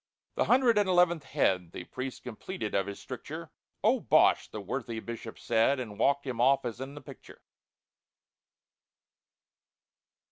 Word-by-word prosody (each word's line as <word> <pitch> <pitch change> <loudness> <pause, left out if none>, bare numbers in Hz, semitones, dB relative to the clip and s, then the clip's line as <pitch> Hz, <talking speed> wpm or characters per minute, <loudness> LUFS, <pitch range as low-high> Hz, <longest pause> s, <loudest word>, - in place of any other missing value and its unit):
The - - +1
hundred 245 -4 +4
and 205 -2 +1
eleventh 175 -4 +3
head 90 - 0
The - - -6
priest 130 +6 -6
completed 115 - -5
of 100 0 +1
his 100 - -6
stricture; - - -8 0.3
"Oh, - - +4
bosh!" - - +4
the 110 - -6
worthy 115 +2 -4
Bishop 115 0 -7
said, 115 +5 +2
And 110 -5 -6
walked 140 0 +2
him 125 -3 -2
off 135 +1 +4
as 120 +1 -4
in 135 +2 -6
the 145 - -9
picture. 140 - -13
130 Hz, 145 wpm, -30 LUFS, 110-145 Hz, 0.3 s, hundred